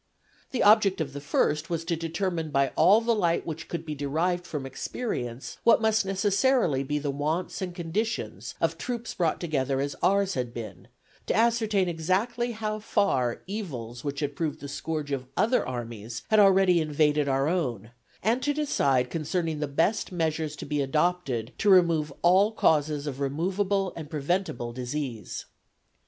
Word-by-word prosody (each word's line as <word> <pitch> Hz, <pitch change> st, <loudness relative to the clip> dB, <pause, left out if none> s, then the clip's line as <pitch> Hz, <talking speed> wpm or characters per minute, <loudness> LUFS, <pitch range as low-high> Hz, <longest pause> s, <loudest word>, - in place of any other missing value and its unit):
The 255 Hz, -, 0 dB
object 205 Hz, -3 st, +5 dB
of 145 Hz, -4 st, -3 dB
the 145 Hz, -, -6 dB
first 150 Hz, +1 st, 0 dB
was 165 Hz, -1 st, -2 dB
to 170 Hz, -, 0 dB
determine 165 Hz, 0 st, -2 dB
by 140 Hz, -2 st, +2 dB
all 195 Hz, +7 st, +5 dB
the 235 Hz, 0 st, +2 dB
light 175 Hz, -6 st, +1 dB
which 160 Hz, -1 st, -6 dB
could 165 Hz, -1 st, -5 dB
be 155 Hz, -, -4 dB
derived 165 Hz, +5 st, -1 dB
from 145 Hz, -4 st, -4 dB
experience 130 Hz, -, -5 dB
what 230 Hz, -, +6 dB
must 220 Hz, -2 st, +2 dB
necessarily 195 Hz, -, +2 dB
be 150 Hz, +2 st, -2 dB
the 145 Hz, -1 st, -2 dB
wants 155 Hz, +8 st, -2 dB
and 180 Hz, -2 st, -4 dB
conditions 165 Hz, -, -3 dB
of 165 Hz, 0 st, 0 dB
troops 240 Hz, +1 st, -4 dB
brought 170 Hz, -3 st, 0 dB
together 140 Hz, -5 st, -1 dB
as 140 Hz, +1 st, -2 dB
ours 195 Hz, 0 st, +2 dB
had 125 Hz, -5 st, -3 dB
been, 115 Hz, -2 st, -8 dB, 0.4 s
to -, -, +1 dB
ascertain 220 Hz, -4 st, +2 dB
exactly 195 Hz, +9 st, 0 dB
how 215 Hz, -1 st, -3 dB
far 130 Hz, -, 0 dB
evils 130 Hz, -, -6 dB
which 140 Hz, 0 st, -3 dB
had 145 Hz, -1 st, -2 dB
proved 155 Hz, -2 st, -2 dB
the 145 Hz, -, -7 dB
scourge 150 Hz, +1 st, -4 dB
of 130 Hz, -2 st, -3 dB
other 250 Hz, +3 st, +3 dB
armies 120 Hz, -2 st, -6 dB
had 215 Hz, -, +6 dB
already 190 Hz, -3 st, +5 dB
invaded 150 Hz, -1 st, +2 dB
our 135 Hz, +1 st, +1 dB
own, 125 Hz, -, -2 dB, 0.3 s
and 230 Hz, +5 st, +2 dB
to 290 Hz, +2 st, 0 dB
decide 135 Hz, -, +1 dB
concerning 160 Hz, 0 st, -2 dB
the 150 Hz, -, -1 dB
best 165 Hz, +11 st, 0 dB
measures 160 Hz, -3 st, -1 dB
to -, -, -7 dB
be 150 Hz, -1 st, -1 dB
adopted 140 Hz, -5 st, 0 dB
to 210 Hz, -, +2 dB
remove 170 Hz, -5 st, +4 dB
all 190 Hz, +5 st, +5 dB
causes 150 Hz, -7 st, +2 dB
of 140 Hz, -2 st, -5 dB
removable 185 Hz, +7 st, 0 dB
and 155 Hz, -3 st, -7 dB
preventable 150 Hz, -6 st, -2 dB
disease. 125 Hz, -2 st, -4 dB
160 Hz, 165 wpm, -27 LUFS, 140-195 Hz, 0.4 s, what